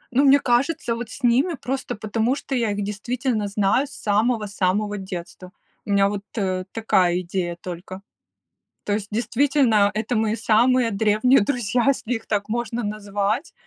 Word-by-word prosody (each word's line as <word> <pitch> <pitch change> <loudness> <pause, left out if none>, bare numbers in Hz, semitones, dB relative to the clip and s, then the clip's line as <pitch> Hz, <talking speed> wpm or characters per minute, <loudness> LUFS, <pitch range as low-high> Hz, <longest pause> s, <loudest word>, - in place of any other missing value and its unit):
Ну, 275 - +5
мне 280 +1 +6
кажется, 245 -1 0
вот, 235 -1 -6
с 260 - -11
ними, 260 +9 +3
просто 260 -1 -3
потому 220 +4 -1
что 280 -1 -6
я 230 -4 0
их 205 0 -2
действительно 220 +2 -2
знаю 205 +7 +1
с - - -15
самого-самого 210 -2 0
детства. 185 -1 -8 0.3
У - - -10
меня, 200 0 +4
вот, 200 0 -3 0.2
э, 185 -2 -1
такая 185 -5 +2
идея 175 -1 -3
только. 185 +2 -7 0.8
То 205 - 0
есть 205 -1 -3
действительно, 235 -2 +2
это 220 +3 -1
мои 220 0 +1
самые 230 +2 +3
древние 215 +5 +3
друзья 240 0 0
если 250 -3 0
их 225 - -6
так 205 0 -1
можно 235 +1 -2
назвать, 205 - -2
215 Hz, 160 wpm, -23 LUFS, 200-245 Hz, 0.8 s, мне